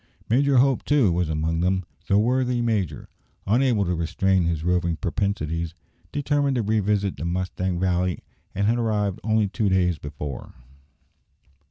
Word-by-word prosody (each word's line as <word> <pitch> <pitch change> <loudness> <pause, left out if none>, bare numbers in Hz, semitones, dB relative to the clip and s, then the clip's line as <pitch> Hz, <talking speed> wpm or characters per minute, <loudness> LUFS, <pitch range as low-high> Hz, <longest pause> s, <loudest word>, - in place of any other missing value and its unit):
Major 135 +3 +3
Hope, 135 +1 +3
too, 140 -10 +3
was 85 -1 0
among 80 +1 -1
them. 95 +1 0 0.2
The 100 - +3
worthy 125 +3 +1
major, 105 -10 -1 0.4
unable 115 -1 +2
to 90 - 0
restrain 90 +2 +1
his 85 -2 -1
roving 85 -1 +1
propensities, 85 -3 -2 0.4
determined 145 -1 0
to 120 - 0
revisit 105 -2 0
the 75 - -5
Mustang 90 0 -2
Valley, 90 -1 0 0.3
and 100 - 0
had 115 +3 +2
arrived 105 -3 0
only 110 -1 +2
two 105 +1 -1
days 90 -3 +2
before. 75 -2 -7
95 Hz, 145 wpm, -24 LUFS, 85-115 Hz, 0.4 s, Major